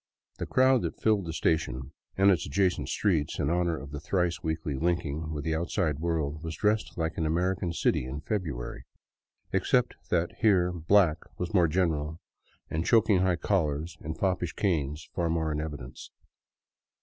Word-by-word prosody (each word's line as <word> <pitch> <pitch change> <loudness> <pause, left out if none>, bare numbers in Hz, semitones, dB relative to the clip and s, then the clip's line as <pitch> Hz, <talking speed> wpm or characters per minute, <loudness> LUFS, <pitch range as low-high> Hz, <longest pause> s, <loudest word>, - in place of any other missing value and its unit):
The - - -3
crowd 130 -1 +4
that - - -4
filled 105 -4 +2
the - - -2
station 80 -5 -1 0.3
and 100 +1 +6
its 85 -6 0
adjacent 90 +6 +1
streets 85 -8 0
in 70 - 0
honor 85 -1 +1
of 70 0 -9
the 75 - -5
thrice 90 +2 0
weekly 80 -2 -2
linking 80 0 -1
with 75 -2 -4
the 80 - -1
outside 80 -2 -1
world 80 -3 -1
was 80 -1 -4
dressed 105 +5 0
like 80 -1 -2
an 80 - +1
American 90 +2 0
city 80 - +1
in 70 +4 -5
February, 75 - -4 0.7
except 120 +6 +2 0.2
that 85 -1 0
here 90 -5 +4
black 85 -1 +3 0.2
was 90 -1 -4
more 90 -4 +5
general 80 -2 0 0.5
and 80 +1 -2
choking 110 -2 +4
high 90 -1 +3
collars 80 -3 -1
and 80 0 -5
foppish 90 -3 0
canes 75 -5 -1
far 85 -2 0
more 80 -1 0
in 75 0 -1
evidence. 70 -5 -7
85 Hz, 165 wpm, -28 LUFS, 75-90 Hz, 0.7 s, and